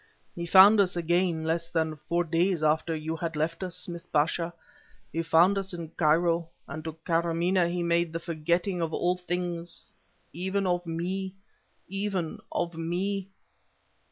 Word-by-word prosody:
He 170 0 -5
found 200 +4 +8
us 185 -3 +3
again 175 -1 +1
less 165 +1 0
than 160 -2 0
four 170 +3 -1
days 170 +1 +1
after 160 +2 +2
you 160 +1 -3
had 165 -1 -4
left 165 +3 -1
us, 180 -2 -3
Smith 175 -1 -5
Pasha!... 165 +3 +1 0.6
He 165 - 0
found 170 +4 +4
us 190 -1 -3
in 165 -2 -6
Cairo, 165 +1 +2 0.2
and 155 +2 -6
to 160 - -4
Karamaneh 170 +1 +2
he 175 0 -1
made 170 -1 +1
the 165 - -3
forgetting 170 +3 -1
of 165 -1 -1
all 180 +1 +1
things 175 -1 -4 0.4
even 190 +4 -1
of 175 -1 0
me 185 +3 -3 0.5
even 195 -4 -2
of 175 -1 -2
me..." 185 +4 -2
170 Hz, 155 wpm, -28 LUFS, 165-180 Hz, 0.6 s, found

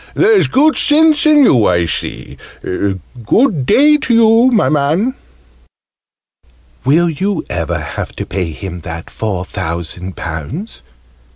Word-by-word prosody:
"There's 415 0 +3
good 305 +4 +2
sense 310 +1 +3
in 300 -2 +5
you, 120 - +4
I 85 -1 +1
see. 80 - -5 0.3
Good 120 - -1
day 300 +2 +5
to 260 -4 -2
you, 230 +2 +5
my 220 -4 +2
man!" 155 - 0 1.7
"Will 155 +7 +3
you 185 +3 -2
ever 85 -4 -2
have - - -6
to - - -5
pay 90 -1 -3
him 90 +2 -7
that 80 0 -8
four 95 -5 -3
thousand 85 +2 -5
pounds?" 85 - -6
145 Hz, 125 wpm, -14 LUFS, -, 1.7 s, in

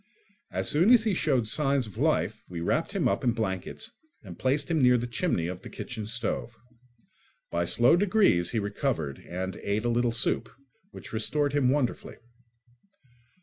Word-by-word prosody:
As - - -2
soon 170 +8 +4
as 240 -3 +7
he 220 -3 +1
showed 135 -9 +1
signs 140 +1 +1
of 105 - -10
life - - +1
we 90 -2 -5
wrapped 85 - -1
him - - +1
up - - 0
in 120 -2 +2
blankets 110 - -4 0.3
and 90 -5 -10
placed 140 +5 0
him 160 -3 +2
near 125 -1 +5
the 120 - -2
chimney 120 - -1
of 90 +1 -5
the - - -10
kitchen 105 -1 -6
stove. 115 0 -3 0.9
By 85 0 0
slow 120 - +4
degrees 185 - +3
he 115 - -2
recovered 100 - -2
and 95 +1 -4
ate 105 +3 -2
a - - +2
little 120 0 +1
soup, 115 - 0 0.4
which - - -11
restored 145 +6 0
him 140 -3 +3
wonderfully. 135 -2 -1
120 Hz, 170 wpm, -28 LUFS, 100-145 Hz, 0.9 s, as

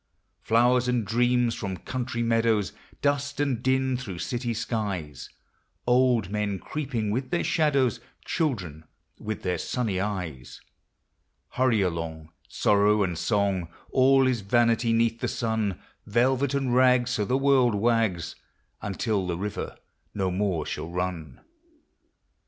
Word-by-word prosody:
Flowers 120 +2 +3
and 125 -3 +1
dreams 120 +2 +2
from 95 -5 -4
country 125 0 -3
meadows, 115 -4 +1 0.3
Dust 140 -1 0
and 135 -5 0
din 130 0 +1
through 100 -8 -6
city 120 +6 -3
skies, 100 - -3 0.6
Old 125 -5 +3
men 105 -2 -1
creeping 120 - -3
with 130 +4 -2
their 170 - 0
shadows, 140 -7 +2 0.3
Children 90 - -2 0.3
with 110 -1 -5
their 90 -1 -1
sunny 110 -7 -2
eyes, 90 -10 -4 0.5
— 70 +3 -49
Hurry 125 -4 +2
along, 80 -3 -3 0.2
sorrow 105 0 +3
and 90 -3 -1
song, 95 0 0 0.2
All 135 +1 +5
is 125 -4 +1
vanity 115 +2 +2
'neath 115 0 +2
the - - -1
sun; 110 -5 -1 0.3
Velvet 130 +5 +2
and 135 -3 0
rags, 125 -1 +4
so 110 -4 0
the 125 +6 +1
world 135 -4 +3
wags, 110 -6 +1 0.5
Until 100 -1 -1
the 85 -2 -2
river 105 +3 -4 0.4
no 95 -2 0
more 90 -5 -1
shall 80 +2 -5
run. 90 -2 -4
115 Hz, 130 wpm, -26 LUFS, 95-125 Hz, 0.6 s, All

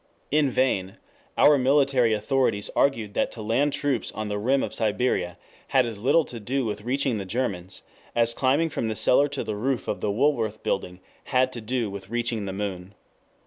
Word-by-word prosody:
In 150 -1 +3
vain 100 -8 0 0.4
our 145 -1 +6
military 135 -3 +3
authorities 110 -1 0
argued 115 -7 +1
that - - 0
to 115 - -8
land 130 +7 +1
troops 140 -5 -1
on 110 -1 -4
the 105 0 -2
rim 130 +6 +2
of - - -4
Siberia 105 -5 0 0.3
had 130 -2 +3
as 115 -3 -6
little 140 +8 +3
to 120 - -8
do 130 +5 -1
with 105 -1 -3
reaching 125 0 0
the - - -3
Germans, 95 -4 -3 0.3
as 115 0 +3
climbing 140 +6 +1
from 115 - -2
the 110 - -2
cellar 140 +7 +4
to 140 -1 -4
the 110 - -4
roof 125 +4 -2
of 100 - -3
the 105 - 0
Woolworth 115 -2 0
building 90 -1 -2 0.2
had 130 -1 +2
to 120 - -6
do 115 -1 -2
with 100 -1 -8
reaching 120 -2 -1
the - - -3
moon. 95 -1 -5
115 Hz, 190 wpm, -25 LUFS, 105-135 Hz, 0.4 s, our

